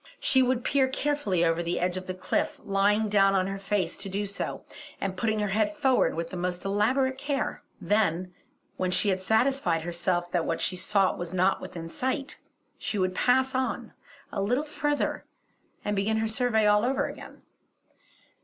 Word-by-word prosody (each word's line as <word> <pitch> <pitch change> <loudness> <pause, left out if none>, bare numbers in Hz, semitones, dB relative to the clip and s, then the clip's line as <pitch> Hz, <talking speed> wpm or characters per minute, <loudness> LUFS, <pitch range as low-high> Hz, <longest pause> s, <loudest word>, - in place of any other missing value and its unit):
She 390 - +4
would 255 -1 +1
peer 270 -1 +3
carefully 260 -10 0
over 165 0 +1
the 170 +1 -1
edge 180 0 0
of 185 0 -5
the 185 - -4
cliff, 185 - -1
lying 205 +2 +2
down 195 -1 +4
on 185 -1 +2
her 195 +1 -4
face 195 -3 -1
to 200 0 -5
do 200 +2 -2
so, 200 0 -4 0.3
and 190 -1 -2
putting 220 +2 0
her 210 -1 0
head 210 +1 0
forward 265 -2 +3
with 165 0 -4
the - - -5
most 180 +1 -3
elaborate 260 +7 +1
care. 280 -1 -2 0.2
Then, 185 -2 +1 0.4
when 185 - 0
she 185 +3 +3
had 190 -1 0
satisfied 220 -5 +2
herself 175 +1 -1
that 175 -2 +1
what 165 - -1
she 185 - 0
sought 190 +1 +1
was 175 0 -5
not 185 +2 +2
within 165 -1 -7
sight, 260 - -3 0.4
she 210 - -3
would 185 -1 +1
pass 260 +6 +2
on 260 0 -2 0.4
a 200 - -2
little 245 +9 +1
further 295 -1 -1 0.6
and 210 - 0
begin 210 +3 +1
her 220 0 0
survey 220 -1 +2
over 220 +6 +3
again. - - -9
200 Hz, 180 wpm, -27 LUFS, 185-250 Hz, 0.6 s, She